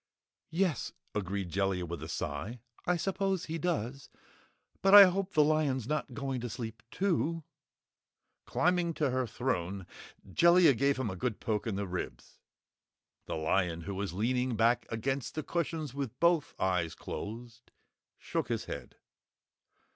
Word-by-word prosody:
"Yes," 170 Hz, -2 st, 0 dB, 0.2 s
agreed 100 Hz, -2 st, -2 dB
Jellia 95 Hz, -1 st, 0 dB
with 85 Hz, 0 st, -6 dB
a -, -, -5 dB
sigh, 80 Hz, +12 st, -4 dB, 0.3 s
"I 180 Hz, 0 st, +3 dB
suppose 195 Hz, 0 st, -1 dB
he 165 Hz, +1 st, -4 dB
does. 140 Hz, -6 st, -2 dB, 0.7 s
But 195 Hz, +1 st, +7 dB
I 205 Hz, -, +14 dB
hope 190 Hz, +1 st, -1 dB
the 150 Hz, -, +7 dB
lion's 145 Hz, -5 st, +1 dB
not 150 Hz, +1 st, -2 dB
going 135 Hz, -3 st, -2 dB
to 120 Hz, -, -4 dB
sleep, 115 Hz, -1 st, -6 dB
too?" 170 Hz, -3 st, 0 dB, 1.0 s
Climbing 175 Hz, -1 st, +1 dB
to 145 Hz, -4 st, +1 dB
her 130 Hz, -1 st, 0 dB
throne, 100 Hz, -6 st, -2 dB, 0.4 s
Jellia 170 Hz, -, +6 dB
gave 140 Hz, +3 st, +2 dB
him 125 Hz, -6 st, -1 dB
a -, -, -5 dB
good 110 Hz, +4 st, -2 dB
poke 110 Hz, 0 st, -1 dB
in 110 Hz, -, -1 dB
the 100 Hz, +1 st, -2 dB
ribs. 90 Hz, -9 st, -6 dB, 0.9 s
The -, -, -2 dB
lion, 85 Hz, +1 st, +1 dB
who 100 Hz, +4 st, -5 dB
was 100 Hz, -1 st, -3 dB
leaning 125 Hz, +6 st, 0 dB
back 115 Hz, +2 st, +3 dB
against 135 Hz, +4 st, -2 dB
the 155 Hz, -, -2 dB
cushions 160 Hz, -3 st, -2 dB
with 140 Hz, -4 st, -4 dB
both 170 Hz, -3 st, +3 dB
eyes 90 Hz, -4 st, 0 dB
closed, 115 Hz, +2 st, -7 dB, 0.5 s
shook -, -, -2 dB
his -, -, -2 dB
head. -, -, -7 dB
125 Hz, 145 wpm, -31 LUFS, 100-160 Hz, 1.0 s, I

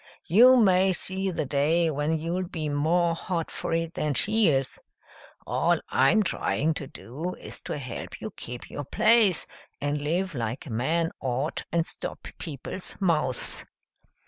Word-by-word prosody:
You 245 Hz, +9 st, +7 dB
may 190 Hz, -4 st, +5 dB
see 190 Hz, +2 st, -1 dB
the 165 Hz, -4 st, -2 dB
day 160 Hz, +5 st, +2 dB
when 150 Hz, +2 st, 0 dB
you'll 175 Hz, +3 st, -2 dB
be 160 Hz, -5 st, -3 dB
more 165 Hz, +4 st, +2 dB
hot 170 Hz, 0 st, -3 dB
for -, -, -4 dB
it 165 Hz, 0 st, -1 dB
than 150 Hz, -2 st, -1 dB
she 215 Hz, -, +4 dB
is. 135 Hz, -4 st, +1 dB, 0.7 s
All -, -, +2 dB
I'm 175 Hz, +12 st, +4 dB
trying 160 Hz, -3 st, 0 dB
to 145 Hz, -2 st, -5 dB
do 155 Hz, +12 st, -6 dB
is -, -, -10 dB
to -, -, -3 dB
help 130 Hz, -4 st, -6 dB
you -, -, -6 dB
keep 125 Hz, 0 st, -8 dB
your 145 Hz, -, -5 dB
place, 215 Hz, -, +4 dB, 0.3 s
and 145 Hz, +1 st, -1 dB
live 175 Hz, +5 st, -1 dB
like 120 Hz, -2 st, -3 dB
a 140 Hz, -, -8 dB
man 160 Hz, +9 st, 0 dB
ought 130 Hz, +4 st, -1 dB
and 165 Hz, -1 st, +1 dB
stop -, -, -6 dB
people's 160 Hz, +4 st, -7 dB
mouths." 150 Hz, -, 0 dB
165 Hz, 155 wpm, -27 LUFS, 145-180 Hz, 0.7 s, You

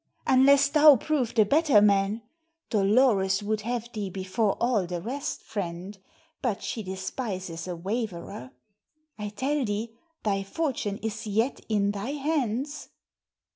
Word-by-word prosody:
"Unless 275 Hz, +2 st, +5 dB
thou 300 Hz, -1 st, +8 dB
prove 260 Hz, -2 st, -1 dB
the 215 Hz, -2 st, +5 dB
better 290 Hz, -1 st, +4 dB
man. 205 Hz, +2 st, +2 dB, 0.5 s
Dolores 200 Hz, -2 st, +3 dB
would 215 Hz, +1 st, -1 dB
have 235 Hz, +1 st, -3 dB
thee 205 Hz, -3 st, -3 dB
before 190 Hz, +3 st, -1 dB
all 230 Hz, -6 st, +1 dB
the 175 Hz, 0 st, -3 dB
rest, 270 Hz, -, -4 dB
friend; 185 Hz, 0 st, -5 dB, 0.5 s
but 230 Hz, -6 st, -2 dB
she 225 Hz, -, -3 dB
despises 190 Hz, -3 st, -5 dB
a 180 Hz, -, -3 dB
waverer. 180 Hz, -, -4 dB, 0.7 s
I 210 Hz, 0 st, -3 dB
tell 270 Hz, +7 st, -1 dB
thee 220 Hz, +1 st, -3 dB, 0.3 s
thy 195 Hz, -2 st, 0 dB
fortune 210 Hz, -2 st, -2 dB
is 220 Hz, 0 st, -4 dB
yet 220 Hz, +6 st, 0 dB
in 205 Hz, -2 st, +2 dB
thy 205 Hz, +7 st, -4 dB
hands." 285 Hz, -1 st, -2 dB
215 Hz, 135 wpm, -27 LUFS, 195-260 Hz, 0.7 s, thou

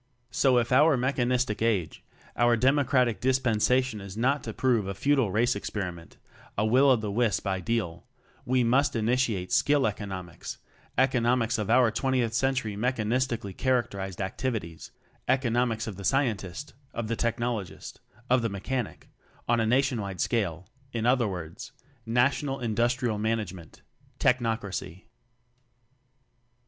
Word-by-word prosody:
So 130 Hz, -2 st, +3 dB
if 120 Hz, 0 st, +1 dB
our 145 Hz, +2 st, +5 dB
Mechanistic 125 Hz, -3 st, 0 dB
Age, 105 Hz, -8 st, 0 dB, 0.3 s
our 120 Hz, 0 st, +3 dB
Democratic 130 Hz, -2 st, +2 dB
Dispensation 125 Hz, -2 st, +1 dB
is 100 Hz, +1 st, -9 dB
not 135 Hz, +5 st, +1 dB
to -, -, -3 dB
prove 120 Hz, -7 st, +1 dB
a 100 Hz, -, -4 dB
futile 135 Hz, 0 st, +2 dB
race 115 Hz, +5 st, +2 dB
experiment, 90 Hz, -5 st, -5 dB, 0.4 s
a 105 Hz, -, +2 dB
will 130 Hz, +5 st, +5 dB
o 130 Hz, -, +6 dB
the 110 Hz, -3 st, -3 dB
wisp 115 Hz, 0 st, +1 dB
ideal, 95 Hz, 0 st, -2 dB, 0.4 s
we 130 Hz, -1 st, +2 dB
must 130 Hz, +5 st, +2 dB
ini 115 Hz, +1 st, +1 dB
tiate 110 Hz, -8 st, 0 dB
Skill 145 Hz, -1 st, +3 dB
economics, 95 Hz, -5 st, -5 dB, 0.4 s
economics 120 Hz, -3 st, +2 dB
of 105 Hz, -1 st, -3 dB
our 120 Hz, -1 st, +5 dB
Twentieth 125 Hz, -1 st, 0 dB
Century 125 Hz, -4 st, 0 dB
mechanis 125 Hz, +2 st, 0 dB
tically 100 Hz, -6 st, -5 dB
characterized 100 Hz, -8 st, -1 dB
activities 95 Hz, -4 st, -4 dB, 0.4 s
eco 130 Hz, -1 st, +2 dB
nomics 115 Hz, -1 st, 0 dB
of 105 Hz, -4 st, -6 dB
the 100 Hz, -, -8 dB
Scientist; 115 Hz, -1 st, -1 dB, 0.2 s
of 120 Hz, -1 st, -3 dB
the 115 Hz, -, -1 dB
Tech 115 Hz, +1 st, -1 dB
nologist, 120 Hz, -6 st, -4 dB, 0.3 s
of 125 Hz, 0 st, +3 dB
the 115 Hz, -, -1 dB
Mechanic, 105 Hz, +4 st, -4 dB, 0.4 s
on 120 Hz, 0 st, +3 dB
a 110 Hz, -, +1 dB
nationwide 115 Hz, -7 st, 0 dB
scale, 95 Hz, -7 st, -1 dB, 0.2 s
in 115 Hz, -2 st, -2 dB
other 125 Hz, -2 st, +3 dB
words: 90 Hz, +7 st, -7 dB, 0.3 s
National 135 Hz, +4 st, +1 dB
Industrial 120 Hz, 0 st, 0 dB
Management 105 Hz, -7 st, -3 dB, 0.4 s
Technocracy. 110 Hz, -7 st, -1 dB
115 Hz, 135 wpm, -27 LUFS, 105-130 Hz, 0.4 s, o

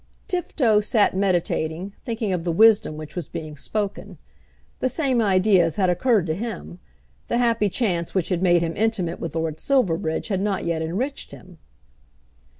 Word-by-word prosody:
Tifto 280 Hz, -, +1 dB
sat 210 Hz, -3 st, +2 dB
meditating, 180 Hz, -1 st, -1 dB
thinking 225 Hz, -4 st, -2 dB
of 175 Hz, -2 st, -2 dB
the 170 Hz, -, -1 dB
wisdom 210 Hz, -4 st, +4 dB
which 155 Hz, +1 st, -9 dB
was 175 Hz, -6 st, -4 dB
being 155 Hz, -1 st, -7 dB
spoken. 205 Hz, +7 st, -4 dB, 0.6 s
The 260 Hz, -, +1 dB
same 260 Hz, -5 st, +1 dB
ideas 185 Hz, -4 st, +3 dB
had 185 Hz, -3 st, +2 dB
occurred 215 Hz, 0 st, +2 dB
to 160 Hz, -, -1 dB
him. 90 Hz, -, -6 dB, 0.5 s
The -, -, 0 dB
happy 230 Hz, -4 st, +2 dB
chance 180 Hz, -6 st, -1 dB
which 185 Hz, -3 st, 0 dB
had 180 Hz, -2 st, 0 dB
made 175 Hz, -2 st, +4 dB
him 165 Hz, 0 st, -2 dB
intimate 205 Hz, -6 st, -1 dB
with 165 Hz, -1 st, -5 dB
Lord 160 Hz, -1 st, -2 dB
Silverbridge 175 Hz, -11 st, 0 dB
had 190 Hz, -2 st, 0 dB
not 200 Hz, -1 st, -1 dB
yet 165 Hz, -1 st, -1 dB
enriched 210 Hz, -, -3 dB
him. 180 Hz, -3 st, -14 dB
190 Hz, 160 wpm, -23 LUFS, 165-225 Hz, 0.6 s, wisdom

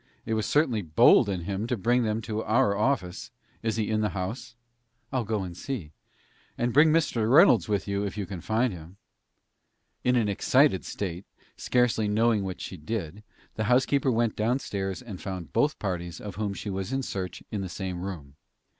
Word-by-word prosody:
It 115 Hz, -, -2 dB
was 110 Hz, -1 st, 0 dB
certainly 140 Hz, -8 st, +2 dB
bold 80 Hz, +4 st, +5 dB
in 95 Hz, -3 st, -2 dB
him 100 Hz, +5 st, -3 dB
to 125 Hz, -, -1 dB
bring 120 Hz, +5 st, +2 dB
them 110 Hz, -1 st, -1 dB
to 110 Hz, -1 st, -3 dB
our 110 Hz, -2 st, +2 dB
office. 105 Hz, -5 st, -1 dB, 0.3 s
Is 110 Hz, -1 st, -1 dB
he 110 Hz, -2 st, -1 dB
in 110 Hz, 0 st, +1 dB
the 105 Hz, -, +1 dB
house?" 115 Hz, +6 st, -5 dB, 0.6 s
"I'll 130 Hz, -2 st, +1 dB
go 105 Hz, -2 st, -1 dB
and 90 Hz, -2 st, -7 dB
see." 95 Hz, -, -5 dB, 0.7 s
"And 120 Hz, 0 st, 0 dB
bring 155 Hz, +3 st, +6 dB
Mr. 120 Hz, -9 st, +1 dB
Reynolds 130 Hz, -, +6 dB
with 100 Hz, -2 st, 0 dB
you, 100 Hz, 0 st, -1 dB
if 100 Hz, 0 st, -4 dB
you 100 Hz, -, -2 dB
can 90 Hz, -2 st, -7 dB
find 110 Hz, +3 st, +1 dB
him." 85 Hz, +2 st, -11 dB, 1.1 s
In 125 Hz, 0 st, +3 dB
an 115 Hz, -4 st, +2 dB
excited 130 Hz, +3 st, +3 dB
state, 90 Hz, -2 st, -5 dB, 0.3 s
scarcely 125 Hz, -3 st, +1 dB
knowing 110 Hz, 0 st, +2 dB
what 95 Hz, -1 st, -5 dB
she 95 Hz, -, -6 dB
did, 90 Hz, +2 st, -5 dB, 0.3 s
the 110 Hz, -, -2 dB
housekeeper 130 Hz, +3 st, +3 dB
went 115 Hz, -1 st, +1 dB
downstairs 105 Hz, -3 st, -2 dB
and 105 Hz, -7 st, -8 dB
found 90 Hz, -6 st, -6 dB
both 150 Hz, +1 st, +2 dB
parties 85 Hz, -3 st, -4 dB
of 105 Hz, -2 st, -7 dB
whom 100 Hz, +1 st, -3 dB
she 100 Hz, -, -5 dB
was 95 Hz, +3 st, -4 dB
in 135 Hz, 0 st, -1 dB
search 90 Hz, -6 st, -5 dB
in 105 Hz, -, -2 dB
the 95 Hz, -, -4 dB
same 90 Hz, -2 st, -4 dB
room. 80 Hz, -8 st, -7 dB
105 Hz, 190 wpm, -27 LUFS, 95-120 Hz, 1.1 s, bring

